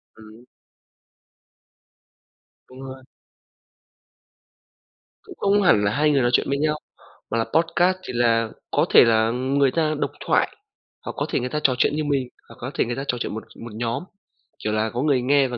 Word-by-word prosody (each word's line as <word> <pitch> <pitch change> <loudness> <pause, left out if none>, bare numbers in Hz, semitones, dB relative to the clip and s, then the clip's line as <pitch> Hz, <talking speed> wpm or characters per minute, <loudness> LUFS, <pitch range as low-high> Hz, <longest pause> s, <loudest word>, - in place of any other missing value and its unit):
Ừm. 110 +2 -15 2.2
Đúng 130 +1 -12
rồi. 130 0 -9 2.2
Cũng 375 - -11
không 200 +1 +2
hẳn 105 - +4
là 100 - +2
2 150 +5 +2
người 140 -2 +3
nói 120 0 +2
chuyện - - +2
với 140 - 0
nhau, 150 +1 0 0.5
mà 115 - 0
là 115 - +2
podcast 175 +3 +2
thì - - -5
là 115 -1 +2 0.2
có - - +2
thể - - +8
là, 110 -1 +3
ừm, 130 +3 -2
người 140 -2 +4
ta 155 0 0
độc - - -1
thoại, - - +1 0.5
hoặc - - -3
có - - -1
thể - - 0
người 125 +1 -3
ta 150 - -2
trò 130 - +3
chuyện 145 - +2
như 155 - -1
mình, 140 -4 0 0.2
hoặc - - -13
có 125 +3 -5
thể - - +1
người 120 0 -3
ta 135 - -4
trò 125 - -1
chuyện - - -4
một 110 - -6 0.2
một 120 - -8
nhóm, 115 +4 -2 0.6
kiểu 105 - -1
là, 110 +1 0
có 120 +3 -3
người 140 -4 +2
nghe 135 +2 +3
và 125 -1 -5
130 Hz, 195 wpm, -23 LUFS, 115-145 Hz, 2.2 s, thể